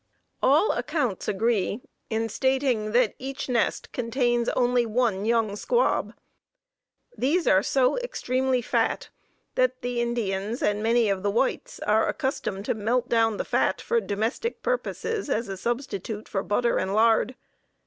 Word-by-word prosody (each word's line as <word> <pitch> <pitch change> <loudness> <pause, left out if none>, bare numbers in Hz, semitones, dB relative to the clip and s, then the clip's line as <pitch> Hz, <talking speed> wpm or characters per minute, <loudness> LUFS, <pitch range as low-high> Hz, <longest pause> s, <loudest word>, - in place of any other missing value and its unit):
All 300 - +4
accounts 255 - -2
agree 210 0 0 0.3
in 225 0 0
stating 260 -3 0
that 240 -3 +3
each 270 +1 -5
nest 245 -3 0
contains 240 -1 0
only 245 -1 +2
one 220 -3 0
young 225 -3 +1
squab. 485 - +1 1.0
These 320 +7 +1
are 190 - +5
so 265 - +2
extremely 260 - -1
fat - - 0 0.4
that 255 0 +1
the 245 -1 -1
Indians, 225 -1 -2
and 210 0 +1
many 230 +1 +3
of 195 -2 0
the 205 - 0
whites, 230 +6 -1
are 215 +1 +2
accustomed 205 -7 -2
to - - +1
melt 235 +3 -1
down 225 -2 +2
the - - -3
fat - - +1
for 470 -1 0
domestic 225 - -2
purposes 460 -5 -2
as 235 -2 0
a 195 - -4
substitute 220 -1 -4
for 195 - -2
butter 235 +4 +1
and 190 +2 -1
lard. 225 +2 +3
235 Hz, 145 wpm, -26 LUFS, 215-255 Hz, 1.0 s, are